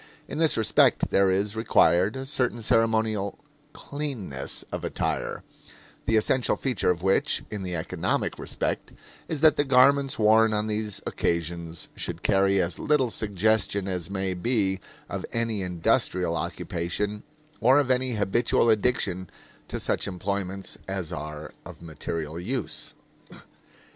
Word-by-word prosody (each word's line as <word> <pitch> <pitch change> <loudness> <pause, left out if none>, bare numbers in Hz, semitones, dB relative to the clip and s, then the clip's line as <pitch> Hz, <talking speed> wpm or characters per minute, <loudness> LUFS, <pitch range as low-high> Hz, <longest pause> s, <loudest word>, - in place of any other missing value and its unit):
In - - -5
this 160 -2 +4
respect 110 - +3
there 100 -1 +4
is 100 +3 0
required 100 -2 +3
a 135 0 -5
certain 125 -4 0
ceremonial 110 -3 +1 0.3
"cleanness" 130 - -4
of - - -4
attire, - - -2 0.6
the 110 - +3
essential 120 +3 +2
feature 125 -10 -1
of 90 -1 0
which, 95 0 +2
in 105 -2 -4
the 90 -2 -3
economic 80 - -2
respect, - - -2 0.4
is 155 -3 -3
that 155 -2 +6
the - - +3
garments 135 +1 +4
worn 110 0 +5
on 105 0 0
these 105 -1 -1
occasions 85 -1 -2
should - - -5
carry 95 0 +3
as 90 -1 -1
little 140 -5 +2
suggestion 105 -1 +1
as 90 -2 -3
may 95 -1 -2
be 95 -1 0 0.3
of - - -5
any 115 -3 -1
industrial 90 -1 0
occupation 90 +5 -3 0.4
or 130 +4 +5
of 135 -3 +1
any 130 0 +1
habitual 115 +2 +2
addiction 100 -5 0 0.4
to - - -4
such - - 0
employments 95 0 -3
as 95 -4 -3
are 75 +1 -6
of - - -11
material 80 0 -5
use. 120 +6 -4
100 Hz, 135 wpm, -26 LUFS, 90-115 Hz, 0.6 s, that